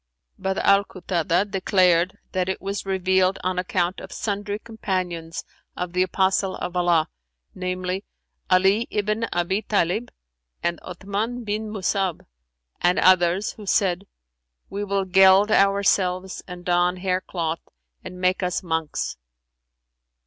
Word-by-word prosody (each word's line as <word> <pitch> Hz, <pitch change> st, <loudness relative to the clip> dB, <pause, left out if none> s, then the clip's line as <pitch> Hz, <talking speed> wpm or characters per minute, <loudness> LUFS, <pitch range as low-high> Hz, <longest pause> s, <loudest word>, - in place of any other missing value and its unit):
But 190 Hz, 0 st, -1 dB
Al 200 Hz, 0 st, +4 dB
Kutαdah 180 Hz, 0 st, -1 dB
declareth 185 Hz, -2 st, +3 dB, 0.2 s
that 185 Hz, 0 st, -1 dB
it 190 Hz, -, -2 dB
was 195 Hz, 0 st, -4 dB
revealed 190 Hz, 0 st, +2 dB
on 185 Hz, 0 st, 0 dB
account 180 Hz, 0 st, -1 dB
of -, -, -10 dB
sundry 205 Hz, -1 st, -3 dB
Companions 185 Hz, -7 st, -4 dB, 0.3 s
of 180 Hz, -1 st, -4 dB
the 180 Hz, -, +2 dB
Apostle 190 Hz, +1 st, +1 dB
of 180 Hz, -, -5 dB
Allah, 175 Hz, -3 st, +3 dB, 0.5 s
namely, 185 Hz, +1 st, -3 dB, 0.5 s
Ali 190 Hz, +5 st, +4 dB
ibn 215 Hz, +2 st, 0 dB
Abν 175 Hz, +4 st, 0 dB
Tαlib 210 Hz, +4 st, +1 dB, 0.5 s
and 170 Hz, -1 st, 0 dB
Othmαn 200 Hz, +7 st, -4 dB
bin 215 Hz, +1 st, -2 dB
Musa'ab 195 Hz, -3 st, -1 dB, 0.6 s
and 175 Hz, +1 st, +3 dB
others, 185 Hz, +2 st, +4 dB
who 210 Hz, -2 st, -12 dB
said, 190 Hz, 0 st, +1 dB, 0.6 s
'We 205 Hz, +1 st, -3 dB
will 195 Hz, -1 st, 0 dB
geld 190 Hz, +2 st, +6 dB
ourselves 190 Hz, -2 st, +2 dB
and 180 Hz, -1 st, -9 dB
don 180 Hz, 0 st, +2 dB
hair 185 Hz, 0 st, 0 dB
cloth 165 Hz, -3 st, -3 dB, 0.4 s
and 180 Hz, -, -8 dB
make 185 Hz, +1 st, +1 dB
us 180 Hz, 0 st, -1 dB
monks.'" 160 Hz, -, -2 dB
185 Hz, 125 wpm, -24 LUFS, 180-200 Hz, 0.6 s, geld